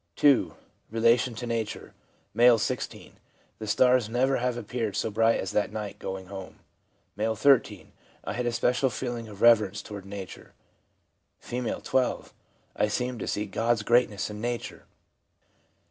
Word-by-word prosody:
(2.) 140 Hz, -3 st, +3 dB, 0.3 s
Relation 115 Hz, +2 st, +2 dB
to 120 Hz, -, -5 dB
nature. 115 Hz, -2 st, -4 dB, 0.2 s
— -, -, -40 dB
M., 120 Hz, +1 st, +6 dB
16. -, -, -4 dB, 0.2 s
' -, -, -37 dB
The 110 Hz, -, -6 dB
stars 125 Hz, +1 st, +3 dB
never 130 Hz, +3 st, +2 dB
have 125 Hz, 0 st, -1 dB
appeared 115 Hz, -2 st, -3 dB
so 110 Hz, -, -1 dB
bright 115 Hz, +2 st, +3 dB
as -, -, -3 dB
that 105 Hz, -1 st, 0 dB
night 105 Hz, -2 st, -6 dB
going 95 Hz, 0 st, -5 dB
home.' 95 Hz, 0 st, -9 dB, 0.6 s
M., 110 Hz, +2 st, -1 dB
[3. 135 Hz, +4 st, +3 dB, 0.2 s
' -, -, -31 dB
I -, -, -4 dB
had 125 Hz, 0 st, -2 dB
a -, -, +1 dB
special 125 Hz, +3 st, +1 dB
feeling 120 Hz, -2 st, -4 dB
of 105 Hz, -2 st, -8 dB
reverence 105 Hz, -4 st, +5 dB
toward 100 Hz, -2 st, -9 dB
nature.' 100 Hz, -2 st, -9 dB, 0.8 s
F., 125 Hz, 0 st, -4 dB
12. 130 Hz, -1 st, -1 dB, 0.2 s
' -, -, -39 dB
I 105 Hz, -, +2 dB
seemed 125 Hz, +3 st, -2 dB
to -, -, -4 dB
see 105 Hz, -, -1 dB
God's 115 Hz, +2 st, 0 dB
great 120 Hz, +3 st, +4 dB
ness 105 Hz, 0 st, -4 dB
in 105 Hz, 0 st, -7 dB
nature.' 120 Hz, 0 st, -4 dB
115 Hz, 165 wpm, -27 LUFS, 105-125 Hz, 0.8 s, M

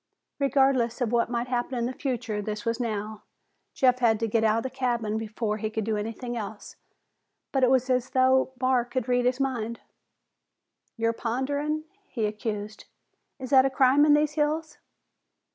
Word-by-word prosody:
Regardless 270 Hz, -4 st, +2 dB
of 240 Hz, -3 st, 0 dB
what 235 Hz, -1 st, +2 dB
might 240 Hz, 0 st, -1 dB
happen 250 Hz, +1 st, -2 dB
in 235 Hz, -, 0 dB
the 250 Hz, -, -3 dB
future, 245 Hz, -6 st, -3 dB
this 210 Hz, +2 st, -5 dB
was 230 Hz, +1 st, -1 dB
now. 215 Hz, -2 st, -3 dB, 0.5 s
Jeff 255 Hz, -2 st, +3 dB
had 225 Hz, -3 st, +3 dB
to 225 Hz, -, +1 dB
get 225 Hz, +1 st, +1 dB
out 220 Hz, 0 st, +3 dB
of 230 Hz, -, -1 dB
the 260 Hz, -, -3 dB
cabin 240 Hz, -5 st, -1 dB
before 215 Hz, -1 st, -3 dB
he 215 Hz, 0 st, -3 dB
could 220 Hz, 0 st, -3 dB
do 220 Hz, +1 st, -1 dB
anything 225 Hz, +3 st, -4 dB
else, 215 Hz, -2 st, -7 dB, 0.8 s
but 270 Hz, -, +1 dB
it 250 Hz, -, +5 dB
was 260 Hz, -1 st, +3 dB
as 255 Hz, 0 st, 0 dB
though 260 Hz, 0 st, +3 dB
Barr 255 Hz, -1 st, +2 dB
could 250 Hz, 0 st, -3 dB
read 245 Hz, 0 st, +2 dB
his 250 Hz, +1 st, +1 dB
mind. 235 Hz, -4 st, -2 dB, 1.2 s
"You're 230 Hz, 0 st, +1 dB
ponderin'," 285 Hz, +7 st, -2 dB, 0.3 s
he 225 Hz, -3 st, -2 dB
accused. 210 Hz, 0 st, -4 dB, 0.5 s
"Is 260 Hz, -1 st, -8 dB
that 265 Hz, -1 st, +7 dB
a 270 Hz, -, +2 dB
crime 265 Hz, +1 st, +4 dB
in 295 Hz, -1 st, +6 dB
these 300 Hz, 0 st, +2 dB
hills?" 305 Hz, +1 st, -1 dB
245 Hz, 180 wpm, -26 LUFS, 225-265 Hz, 1.2 s, that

